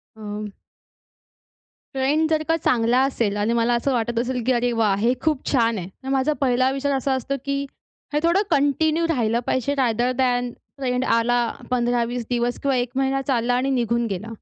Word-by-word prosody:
अ, 210 -1 -6 1.4
trend 295 +4 +1
जर 310 -1 +2
का 325 - +3
चांगला 245 -3 +2
असेल 230 -6 -1
आणि 210 +3 0
मला 235 +1 +2
असं 260 +3 0
वाटत 235 -1 -1
असेल 250 0 -1
की 260 - +4
अरे 245 0 +1
वाह! 220 -4 +2
हे 230 +5 +2
खूप 305 -4 0
छान 230 -4 +2
आहे. 175 0 -6
तर 265 - -7
माझा 270 +2 +1
पहिला 255 0 +2
विचार 280 +1 -1
असा 265 +1 -1
असतो, 260 +2 -2
की 280 0 -1 0.5
हे 295 - +2
थोडं 345 +4 +3
कंटिन्यू 310 +4 +2
राहिलं 235 -6 +1
पाहिजे. 270 +3 0
रॅदर 245 0 +1
दॅन 245 -1 +1
ट्रेंड 255 -1 -4
आला, 240 +1 +2 0.3
15-20 240 -1 0
दिवस 240 0 0
किंवा 275 -2 +1
1 245 -1 -1
महिना 270 0 +1
चालला 245 -1 +1
आणि 260 +2 0
निघून 235 -2 +1
गेला. 205 +2 -4
245 Hz, 180 wpm, -23 LUFS, 235-270 Hz, 1.4 s, की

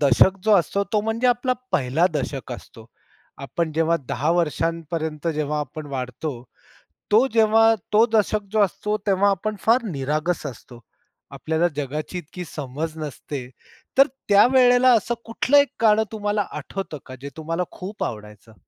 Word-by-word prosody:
दशक 145 +7 +5
जो 215 - +4
असतो, 200 +4 0
तो 210 - +3
म्हणजे 225 +3 -1
आपला 245 +1 +1 0.2
1ला 155 +2 +2
दशक 135 -2 -3
असतो. 115 -2 -11 0.6
आपण 160 +3 -2
जेव्हा 165 +1 +2
10 150 +4 0
वर्षांपर्यंत 165 -1 -2
जेव्हा 150 0 -1
आपण 150 +2 -7
वाढतो, 130 -1 -5 0.7
तो 220 +5 +6
जेव्हा 225 0 +5 0.2
तो 220 +2 +6
दशक 215 -1 +2
जो 215 - +1
असतो, 210 +2 0
तेव्हा 200 +1 +3
आपण 210 +3 -2
फार 235 +2 +3
निरागस 150 +4 -2
असतो, 120 -2 -9 0.5
आपल्याला 160 +2 0
जगाची 150 +5 -4
इतकी 175 +2 -7
समज 150 +3 -5
नसते, 145 -3 -6 0.5
तर 275 +2 +7 0.2
त्यावेळेला 245 +4 +6
असं 230 +3 -2
कुठलं 250 +5 +2
एक 285 0 +4
गाणं 220 -1 +5
तुम्हाला 210 -1 -1
आठवतं 195 -6 -6
का? 130 - -9
जे 140 - -6
तुम्हाला 165 +3 -2
खूप 195 +3 -6
आवडायचं. 105 0 -7
170 Hz, 145 wpm, -23 LUFS, 145-215 Hz, 0.7 s, तर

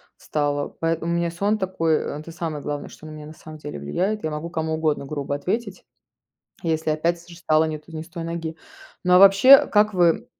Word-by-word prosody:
встала, 145 -1 -2
поэтому 165 +1 -1
у - - +1
меня 170 0 0
сон 200 +5 0
такой- 165 -5 0 0.2
это 160 +2 -10
самое 160 -3 -5
главное, 145 -1 -4
что 155 - -14
на - - -8
меня 155 -1 -9
на 155 - -10
самом 155 0 -12
деле 145 - -7
влияет. 190 - -2
Я 155 - -2
могу 150 +3 -5
кому 160 -1 -2
угодно 155 -3 -1
грубо 140 -1 -3
ответить, 200 +6 -3 0.8
если, 160 -2 -1
опять 170 +3 0
с 170 - -18
же, 170 - -12
встала 155 -3 +2
не 155 -1 -3
то 155 - -20
не 155 - -4
с 165 - -14
той 170 -2 -6
ноги. 165 -1 -5 0.5
Но, 180 0 +3
а - - +8
вообще, 195 +8 +8
как 210 0 +2
вы 175 -3 +3
165 Hz, 220 wpm, -23 LUFS, 155-180 Hz, 0.8 s, а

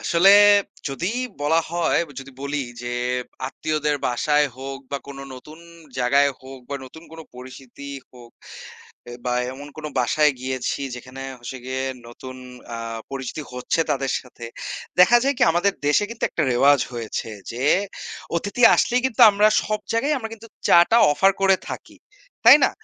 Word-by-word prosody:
আসলে 175 +4 +4 0.6
যদি 135 +6 -4 0.3
বলা 160 +3 +2
হয়, 170 -1 +1 0.2
যদি 135 0 -12
বলি 140 0 -2 0.2
যে 120 0 -4 0.5
আত্মীয়দের 150 +1 -2
বাসায় 150 +4 +2
হোক 135 +1 -6
বা 140 - -1
কোনো 135 -1 -8
নতুন 150 +5 -13 0.4
জায়গায় 140 +3 +3
হোক 130 0 -11
বা - - -2
নতুন 160 +5 -13
কোনো 160 0 -9
পরিস্থিতি 130 +2 -11 0.2
হোক 120 -2 -15 0.8
এ - - -8
বা 125 - -1 0.2
এমন 145 +2 -10
কোনো 155 -1 -6
বাসায় 150 +4 +3
গিয়েছি 130 +1 -3
যেখানে 130 +2 -9 0.2
হচ্ছে 125 +2 -7
গিয়ে 130 +1 -3 0.2
নতুন 130 +2 -10 0.4
আ - - -4 0.3
পরিচিতি 135 +3 -5
হচ্ছে 125 +6 -1
তাদের 135 -1 0
সাথে। 125 -2 -13 0.6
দেখা 230 +7 +7
যায় 280 0 +2
কি - - +1
আমাদের 195 +4 +2
দেশে 150 +8 +3
কিন্তু 230 - -4
একটা 160 - -1
রেওয়াজ 140 +2 +4
হয়েছে 115 -1 -5 0.2
যে 125 +3 -4 0.7
অতিথি 205 +7 -3
আসলেই 250 +1 +2
কিন্তু 250 -1 -4
আমরা 205 +1 +4
সব 215 0 -2
জায়গায় 280 +7 +1
আমরা 225 -2 -6
কিন্তু 225 +1 -15 0.2
চা-টা 175 +7 +6 0.2
অফার 195 +6 +4
করে 195 -1 +4
থাকি। - - -8 0.5
তাই - - +10
না? - - +3
140 Hz, 155 wpm, -22 LUFS, 130-175 Hz, 0.8 s, তাই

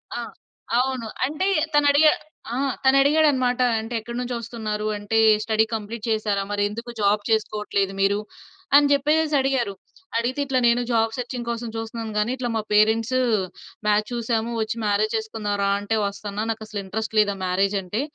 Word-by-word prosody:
ఆ! - - -3 0.6
అవును. 255 -3 -1 0.2
అంటే 305 +8 -1 0.3
తనడిగ 290 +1 +5 0.5
ఆహ్, 270 0 0
తనడిగాడనమాట, 275 -2 +4 0.2
అంటే 225 +2 -6
ఎక్కడి 235 +2 -7
నుంచి 250 0 -4
వస్తున్నారు 220 -2 -4
అంటే 205 +2 -2 0.3
స్టడీ 220 0 +2
కంప్లీట్ 220 +1 -6
చేసారా? 210 -2 0
మరి 205 - -1
ఎందుకు 230 +3 -7
జాబ్ 205 +1 +3
చేసుకోవట్లేదు 210 -2 0
మీరు 200 +1 +2 0.6
అని 285 0 +6
చెప్పేసేసి 300 +2 +2
అడిగారు. 260 -6 0 0.4
అడిగితే 245 +4 -1
ఇట్లా 260 -2 +1
నేను 235 +1 +4
జాబ్ 225 -1 +2
సెర్చింగ్ 245 -1 -5
కోసం 235 0 -3
చూస్తున్నాను 225 0 -5
గానీ 210 +4 +1
ఇట్లా 250 -2 -3
మా 220 - +1
పేరెంట్స్ 225 +4 +3 0.7
మాచ్ 210 0 +3
చూసాము 235 -1 -1
వచ్చి 220 +1 -2
మ్యారేజ్ 210 +2 +1
చేసుకుందాం 220 -2 -3
రా! 200 - +2
అంటే 205 +2 -2
వస్తన్న, 200 0 -6
నాకసలు 215 -2 -6
ఇంట్రెస్ట్ 220 +3 -4
లేదు 205 -1 +4
ఆ - - -11
మ్యారేజ్ 195 +2 +1
అంటే 205 +7 -3
225 Hz, 155 wpm, -23 LUFS, 210-250 Hz, 0.7 s, అని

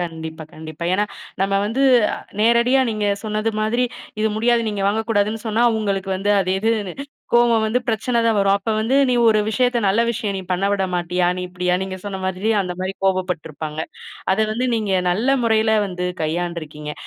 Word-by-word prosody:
கண்டிப்பா 160 -2 -5
கண்டிப்பா. 155 +1 -8
ஏன்னா, 205 +2 +2 0.4
நம்ம 195 0 +1
வந்து 230 +6 -1 0.6
நேரடியா 235 +4 +4
நீங்க 210 -1 -1 0.2
சொன்னது 215 0 -1
மாதிரி, 235 +4 +1 0.4
இது 220 - +2
முடியாது 235 +2 +3
நீங்க 205 -2 -3
வாங்கக்கூடாதுன்னு 215 0 0
சொன்னா 220 +2 +1 0.2
உங்களுக்கு 195 -2 -2
வந்து 200 +2 -1
அது 185 - -1
எது 225 +2 +2 0.6
கோவம் 235 -2 +4
வந்து 225 +3 +1
பிரச்சனை 235 +2 0
தான் 225 - +2
வரும். 195 0 +3
அப்ப 210 +3 -3
வந்து 235 +5 +1
நீ - - +2
ஒரு 215 -1 +4
விஷயத்த 245 +1 +1
நல்ல 210 +4 +3
விஷயம் 215 -3 -3
நீ 190 - -4
பண்ணவிடமாட்டியா, 180 -2 0
நீ 180 - -3
இப்படியா? 180 0 -1
நீங்க 190 0 -5
சொன்ன 195 -2 -5
மாதிரி 190 +4 -1
அந்த 180 -1 -4
மாதிரி 190 +1 -3
கோபப்பட்டு 185 -3 0
இருப்பாங்க. 155 +1 -6 0.5
அத 190 - -1
வந்து 245 +4 -1
நீங்க 215 -4 -1 0.2
நல்ல 215 +9 0 0.2
முறையில 220 -1 +3
வந்து 180 -1 -4 0.2
கையாண்டு 170 +2 -2
இருக்கீங்க. 150 0 -7
200 Hz, 170 wpm, -21 LUFS, 180-225 Hz, 0.6 s, நேரடியா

